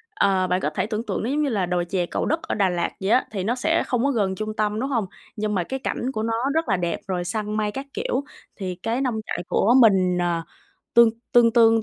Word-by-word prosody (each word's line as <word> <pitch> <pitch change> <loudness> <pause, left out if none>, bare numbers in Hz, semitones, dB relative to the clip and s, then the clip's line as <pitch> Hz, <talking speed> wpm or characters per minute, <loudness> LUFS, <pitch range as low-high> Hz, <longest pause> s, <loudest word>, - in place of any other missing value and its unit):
ờ, 190 -2 +2
bạn 180 +1 +1
có - - 0
thể 155 - -2
tưởng 220 0 -3
tượng - - -2
nó 230 - -1
giống 295 +3 0
như 285 - +1
là 200 -6 0
đồi 175 -1 -1
chè 180 -1 -1
Cầu - - -2
Đất 320 +2 0
ở - - -3
Đà 195 -3 +2
Lạt 175 -1 -1
vậy 190 - -1
á, 255 - +4
thì 195 -4 -3
nó 230 +5 0
sẽ 320 +6 +1
không 245 -1 0
có 280 - +2
gần 200 -6 0
trung 215 +1 -4
tâm, 210 0 0
đúng 265 +3 -2
hông? 230 -7 0 0.3
Nhưng 210 -1 -2
mà 180 - +1
cái 265 +9 -4
cảnh 260 0 -2
của 215 -3 -3
nó 230 - -1 0.2
rất 320 -1 0
là 195 - +3
đẹp, 175 -1 -2
rồi 180 -2 -1
săn 210 +3 -2
mây 210 -1 0
các 270 +5 -6
kiểu. 450 - -1 0.3
Thì 185 -3 -4
cái 225 +7 -2
nông 255 -4 0
trại - - -3
của 230 +4 +3
mình, 190 -5 +4
ờ, 175 -1 0 0.5
tương 235 -1 +7 0.2
tương 240 -1 +6
tương 225 -1 +5
215 Hz, 270 wpm, -23 LUFS, 185-240 Hz, 0.5 s, tương